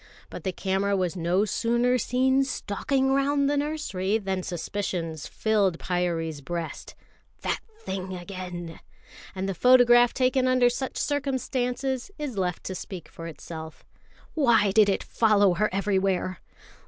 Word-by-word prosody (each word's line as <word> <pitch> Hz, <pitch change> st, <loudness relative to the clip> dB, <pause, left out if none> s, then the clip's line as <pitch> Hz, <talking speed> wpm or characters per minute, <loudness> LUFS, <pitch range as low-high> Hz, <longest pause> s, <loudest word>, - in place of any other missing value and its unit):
But -, -, -8 dB
the 190 Hz, -, -1 dB
camera 195 Hz, +2 st, 0 dB
was 185 Hz, -1 st, -1 dB
no 180 Hz, +4 st, +1 dB
sooner 240 Hz, +3 st, +1 dB
seen 260 Hz, +3 st, +2 dB
stalking 265 Hz, +2 st, -1 dB
round 280 Hz, +1 st, +2 dB
to -, -, +2 dB
the -, -, 0 dB
nursery, 280 Hz, -10 st, -1 dB
than 190 Hz, -3 st, -2 dB
suspicions 175 Hz, -3 st, -4 dB
filled 205 Hz, -5 st, +1 dB
Pyârie's 170 Hz, -4 st, -2 dB
breast. 165 Hz, +3 st, -5 dB, 0.5 s
That -, -, -1 dB, 0.2 s
thing 190 Hz, -, -5 dB
again! 175 Hz, -2 st, -7 dB, 0.6 s
And 190 Hz, +1 st, -2 dB
the 195 Hz, -, -1 dB
photograph 245 Hz, +3 st, +6 dB
taken 255 Hz, 0 st, +2 dB
under 255 Hz, -1 st, +4 dB
such 265 Hz, +1 st, -4 dB
circumstances 265 Hz, -2 st, -1 dB
is 295 Hz, -6 st, -4 dB
left 180 Hz, -3 st, -2 dB
to 190 Hz, -, -4 dB
speak 185 Hz, -2 st, -7 dB
for 165 Hz, -, -8 dB
itself. 160 Hz, -1 st, -9 dB, 0.5 s
Why 235 Hz, -9 st, +4 dB
did 210 Hz, 0 st, +5 dB
it 195 Hz, -, 0 dB
follow 205 Hz, -4 st, +3 dB
her 210 Hz, +4 st, +1 dB
everywhere? 190 Hz, -2 st, 0 dB
200 Hz, 140 wpm, -26 LUFS, 180-255 Hz, 0.6 s, photograph